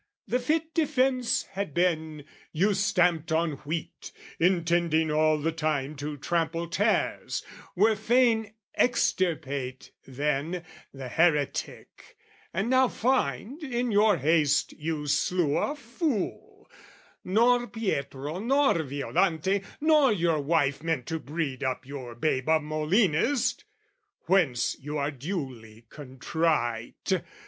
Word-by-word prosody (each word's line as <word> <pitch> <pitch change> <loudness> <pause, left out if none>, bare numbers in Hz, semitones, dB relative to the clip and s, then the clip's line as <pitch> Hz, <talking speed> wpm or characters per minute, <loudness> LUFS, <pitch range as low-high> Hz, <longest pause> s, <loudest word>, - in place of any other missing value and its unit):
"'The 250 - +1
fit 315 +5 -1
defence 265 -5 +1
had 195 -6 -4
been, 160 -4 0 0.3
you 195 +6 +2
stamped 180 -5 +1
on 160 0 +1 0.2
wheat, 160 +1 -5 0.3
"'Intending 170 -2 +2
all 155 0 +3
the 155 +2 -1
time 155 -3 -2
to 145 +1 -5
trample 165 +2 -1
tares, 205 +6 0 0.3
"'Were 215 +4 +4
fain 220 -1 +2 0.2
extirpate, 145 - 0 0.2
then, 150 +5 -2 0.3
the 135 -2 -8
heretic, 150 +1 -1 0.3
"'And 195 +5 -1
now 260 +1 +4
find, 245 - -1
in 245 -4 -2
your 205 -1 +4
haste 150 0 +2
you 155 -1 -4
slew 150 +1 +1
a 290 - 0
fool: 250 - -4 0.6
"'Nor 240 +5 +3
Pietro, 150 - -3
nor 270 - +2
Violante, 160 +6 0 0.2
nor 305 -3 +5
your 170 -6 +1
wife 145 -2 +1
"'Meant 160 -6 -1
to 160 - -3
breed 145 -3 -4
up 130 0 -2
your 130 -4 -8
babe 130 +1 -1
a 160 0 +5
Molinist! 165 - +1 0.6
"'Whence 160 -10 +2
you 150 +2 -5
are 145 0 -1
duly 130 - -6
contrite. 135 +2 -2
165 Hz, 115 wpm, -27 LUFS, 145-210 Hz, 0.6 s, nor